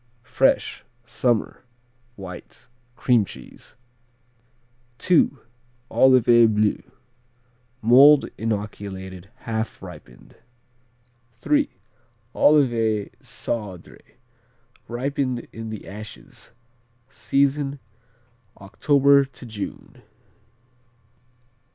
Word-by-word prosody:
Fresh; - - +1 0.2
summer, 120 -1 -1 0.5
white; 90 -3 -11 0.3
cream 120 -4 +3
cheese. - - -12 1.3
II. 180 -3 +5 0.6
Olivet 120 -4 +5
Bleu 105 0 +1 1.0
mold 135 +6 +7
inoculated; 100 -3 -5
half 110 0 -4
ripened. 60 - -13 1.1
III. 290 -1 +3 0.6
Olivet 115 -8 +2
Cendré, 100 -7 -6 0.9
ripened 130 0 -3
in 115 0 -7
the 110 -1 -8
ashes. 105 +1 -11 0.6
Season, 140 +1 0 0.8
October 140 +7 +3
to 135 -1 -12
June. 110 -3 -8
115 Hz, 65 wpm, -23 LUFS, 105-135 Hz, 1.3 s, mold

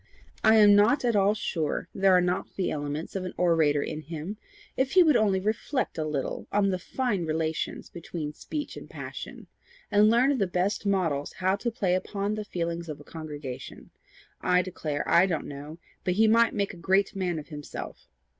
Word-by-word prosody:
I 220 0 +6
am 205 -2 +7
not 230 +7 +4
at 235 -2 +2
all 200 +1 +4
sure 160 -7 -2
there 195 -1 +4
are 180 - +6
not 180 +1 -2
the 190 - -1
elements 145 +3 -4
of 190 - -2
an 185 - -6
orator 160 -5 +3
in 155 - -5
him, 165 +6 -6 0.4
if 265 0 0
he 370 -1 +8
would 310 -5 +4
only 200 -4 +3
reflect 215 - -2
a - - 0
little 150 -3 -3
on 200 -1 +2
the 185 - -1
fine 220 -1 -1
relations 160 0 -2
between 160 -3 -6
speech 295 - -5
and - - -10
passion, - - -8 0.5
and 210 +1 +5
learn 245 +5 +4
of 275 - 0
the 195 - +2
best 185 +4 -1
models 165 -8 0
how 185 +1 +1
to 235 - -2
play 195 -5 0
upon 200 +2 -1
the 215 0 -3
feelings 170 -3 -4
of 150 -1 -6
a - - -12
congregation. 150 -5 -8 0.5
I 180 0 +3
declare 155 -5 -4
I 175 +3 +5
don't 165 -5 -2
know, 145 +3 -8 0.3
but 180 - 0
he 220 +2 +5
might 230 +1 +4
make 200 -1 -1
a - - -11
great 190 +4 +1
man 180 -3 -1
of 155 - -8
himself. 145 -2 -8
185 Hz, 195 wpm, -27 LUFS, 160-210 Hz, 0.5 s, he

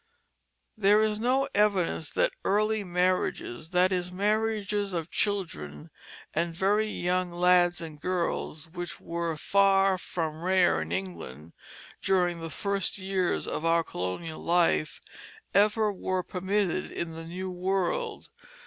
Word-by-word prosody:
There 210 0 +4
is 215 -1 0
no 260 +4 +2
evidence 195 -7 +2
that - - +2
the - - -6
early 215 +1 +2
marriages, 180 -6 -1
that 180 +1 +3
is, 180 -1 -1
marriages 205 0 0
of 165 0 -3
children 75 - -3 0.4
and 170 +1 -1
very 205 +4 +2
young 180 -3 -1
lads 175 0 +3
and 155 -3 -8
girls, 170 -3 -2
which 175 -1 -5
were 170 -1 -3
far 195 +1 +3
from 160 -3 -4
rare 180 - +3
in 80 +1 -5
England 85 -5 -5 0.5
during 180 -3 +1
the 165 - -5
first 200 +5 -1
years 190 -2 -1
of - - -3
our 165 0 +3
colonial 155 - -5
life, 165 - +2 0.5
ever 210 +1 +3
were 185 -1 -2
permitted 190 0 -1
in 165 -1 -4
the 165 0 -8
new 185 +2 -5
world. 185 0 -2
180 Hz, 130 wpm, -28 LUFS, 165-200 Hz, 0.5 s, There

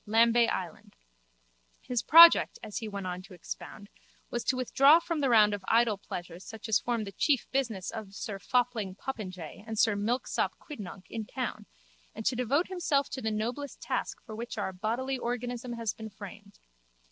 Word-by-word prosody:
Lambay 230 +2 +5
Island_. - - -5 0.9
His 245 -2 -2
project, 335 +2 +8
as 215 -2 -4
he 225 - -5
went 200 -2 -5
on 180 0 -4
to 185 0 -13
expound, 200 +4 -8 0.4
was 240 - -2
to 260 - +2
withdraw 275 +5 +6
from 335 -2 -3
the 275 - +2
round 210 -3 +6
of 205 -2 -4
idle 225 -3 +3
pleasures 175 -2 -7
such 220 0 -8
as 220 - +3
form 235 -2 -1
the 200 - -7
chief 270 +6 +1
business 230 -9 -1
of 215 -3 -8
sir 200 -2 -5
Fopling 235 -5 0
Popinjay 190 - -6
and 220 -1 -4
sir 220 0 +4
Milksop 225 +5 -1
Quidnunc 205 - -9
in 220 -1 -4
town 230 -5 -4 0.5
and 220 0 -7
to 255 - +2
devote 260 +7 +1
himself 335 -7 0
to 260 - -4
the 220 - -1
noblest 235 +6 -3
task - - -3
for 220 - -9
which 235 +1 -6
our 195 -2 -2
bodily 240 +7 -2
organism 245 0 -3
has 230 -3 -2
been 220 0 -8
framed. 200 0 -11
225 Hz, 180 wpm, -29 LUFS, 205-250 Hz, 0.9 s, project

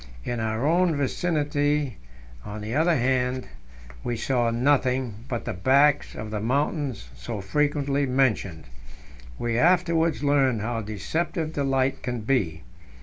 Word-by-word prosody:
In 120 -1 -3
our 110 +3 -1
own 170 +1 +3
vicinity, 145 - 0 0.5
on 105 - -7
the 110 +2 -4
other 160 +4 +3
band, 125 -1 0 0.6
we 120 -1 -2
saw 120 0 +1
nothing 125 -2 +1
but 120 -3 -3
the - - -2
backs 140 +9 +3
of 110 -1 -6
the 105 - -2
mountains 135 - -1
so 60 - -6
frequently 140 +5 0
mentioned. 115 -11 0 0.7
We 120 0 -1
afterwards 170 -2 +2
learned 135 -5 +2
how 115 +1 -2
deceptive 155 - -3
the 145 - -1
light 135 0 +1
can 125 -2 -3
be. 100 - 0
130 Hz, 135 wpm, -25 LUFS, 115-145 Hz, 0.7 s, own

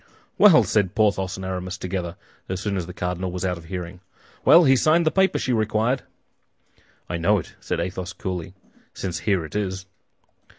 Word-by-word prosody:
"Well!" 180 - +8
said 105 -1 0
Porthos 100 -4 +1
and 95 - -6
Aramis 90 -1 -4
together, 90 -2 -4 0.3
as 95 -1 -2
soon 100 0 -2
as 90 -3 -3
the - - -7
cardinal 90 +1 -3
was 90 +1 -3
out 90 -2 -1
of 85 - -14
hearing, 90 0 -6 0.4
"well, 175 - +8
he 135 -3 +5
signed 160 +5 +3
the 155 - +3
paper 190 0 +2
she 130 - -1
required!" 110 +3 +1 1.1
"I 85 - -3
know 100 +6 +3
it," 90 - -6
said - - -3
Athos, 90 +1 -4
coolly, 90 -1 -5 0.4
"since 90 -3 -4
here 95 -6 0
it 80 - -11
is." 95 -2 -2
95 Hz, 180 wpm, -23 LUFS, 90-110 Hz, 1.1 s, Well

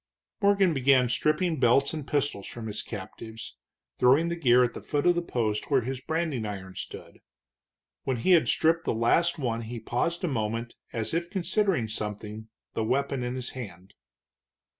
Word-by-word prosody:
Morgan 200 -3 +4
began 130 -2 +4
stripping 155 +5 +1
belts 135 +4 +4
and 155 -3 -5
pistols 145 -9 -1
from 115 -2 -7
his 105 -1 -3
captives, 110 +2 -8 0.4
throwing 140 +7 +5
the 170 - -1
gear 125 -6 +5
at 120 - 0
the - - -7
foot 145 -1 -1
of 175 - +6
the 175 - 0
post 110 -9 -2
where 135 -3 +4
his 130 +2 -4
branding 160 -5 -1
iron 95 -3 -6
stood. - - -8 0.8
When 130 - -1
he 150 +11 +1
had 170 -3 +6
stripped 165 +1 +2
the - - 0
last 170 +10 +2
one 115 -5 -1
he 115 +1 -6
paused 145 +11 -1
a - - +2
moment 115 -3 -2 0.2
as 115 +3 -3
if 170 +1 -1
considering 190 - +1
something, 105 0 -5 0.2
the 110 - -1
weapon 135 +3 0
in 125 +1 -3
his 125 -1 -4
hand. 100 -6 -9
125 Hz, 175 wpm, -28 LUFS, 110-160 Hz, 0.8 s, of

